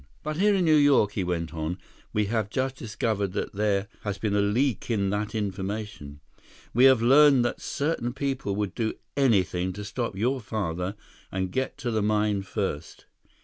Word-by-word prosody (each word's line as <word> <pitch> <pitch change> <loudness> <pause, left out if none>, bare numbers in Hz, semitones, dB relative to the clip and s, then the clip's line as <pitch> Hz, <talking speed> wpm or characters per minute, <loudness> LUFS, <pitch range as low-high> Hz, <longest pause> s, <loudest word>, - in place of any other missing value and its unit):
But 155 0 -3
here 205 +2 +4
in 185 -2 +2
New 155 -1 +5
York," 145 -8 +4
he 100 - -2
went 85 -2 -2
on, 80 +2 -3 0.3
"we 105 0 +1
have 110 -1 -1
just 130 +3 -1
discovered 105 -4 -2
that - - -3
there 100 0 0
has 105 -1 -3
been 100 0 -1
a 100 - +3
leak 115 +3 0
in 100 -4 +1
that 105 +2 -2
information. 100 -6 -4 0.5
We 125 +3 +5
have 130 -4 +6
learned 135 0 +6
that 120 - -2
certain 140 -5 -1
people 135 -6 -2
would 100 -3 -2
do 110 -2 -2 0.2
anything 95 -9 +2
to 105 +1 -7
stop 115 0 -3
your 125 +7 0
father 95 -3 -3 0.4
and 95 -1 -2
get 130 +7 -2
to 130 -5 -3
the 110 -1 +1
mine 105 -1 +1
first. 95 -6 -4
105 Hz, 180 wpm, -26 LUFS, 100-130 Hz, 0.5 s, have